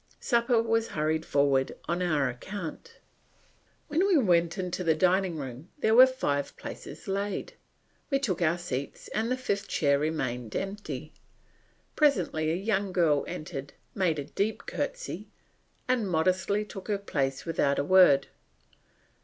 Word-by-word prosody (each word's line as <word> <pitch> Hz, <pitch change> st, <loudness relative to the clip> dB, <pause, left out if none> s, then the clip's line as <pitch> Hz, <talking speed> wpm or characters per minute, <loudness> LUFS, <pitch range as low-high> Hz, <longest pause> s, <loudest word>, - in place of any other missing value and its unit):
Supper 235 Hz, -1 st, +2 dB
was 225 Hz, 0 st, +1 dB
hurried 155 Hz, +1 st, 0 dB
forward 140 Hz, -2 st, +2 dB
on 175 Hz, +1 st, -1 dB
our 155 Hz, -6 st, +2 dB
account. 160 Hz, +7 st, -7 dB, 0.9 s
When 335 Hz, +6 st, +2 dB
we 375 Hz, -5 st, +4 dB
went 175 Hz, -, +3 dB
into 180 Hz, -1 st, -3 dB
the 160 Hz, -2 st, +3 dB
dining 185 Hz, 0 st, +2 dB
room 135 Hz, +3 st, -7 dB
there 220 Hz, -6 st, +2 dB
were 255 Hz, +3 st, +9 dB
five 145 Hz, -, -2 dB
places 150 Hz, -, -9 dB
laid; 200 Hz, -, -2 dB, 0.6 s
we 275 Hz, -, +3 dB
took 205 Hz, -11 st, -2 dB
our 170 Hz, +1 st, +2 dB
seats 140 Hz, -6 st, -5 dB
and 220 Hz, +2 st, -1 dB
the 255 Hz, -, +1 dB
fifth 200 Hz, -5 st, -2 dB
chair 140 Hz, -2 st, +2 dB
remained 130 Hz, -7 st, -2 dB
empty. 200 Hz, +2 st, -5 dB, 0.8 s
Presently 180 Hz, -, +2 dB
a 160 Hz, -, +1 dB
young 200 Hz, 0 st, -1 dB
girl 160 Hz, -6 st, +3 dB
entered, 150 Hz, -5 st, -6 dB, 0.2 s
made 180 Hz, -5 st, +1 dB
a 145 Hz, -, -2 dB
deep 200 Hz, +9 st, -2 dB
courtesy, -, -, -4 dB, 0.6 s
and 245 Hz, -6 st, +1 dB
modestly 185 Hz, +5 st, +1 dB
took 195 Hz, -2 st, -9 dB
her 205 Hz, -2 st, +1 dB
place 135 Hz, -9 st, -2 dB
without 145 Hz, -4 st, +1 dB
a -, -, +1 dB
word. 145 Hz, -5 st, +6 dB
180 Hz, 145 wpm, -28 LUFS, 150-210 Hz, 0.9 s, were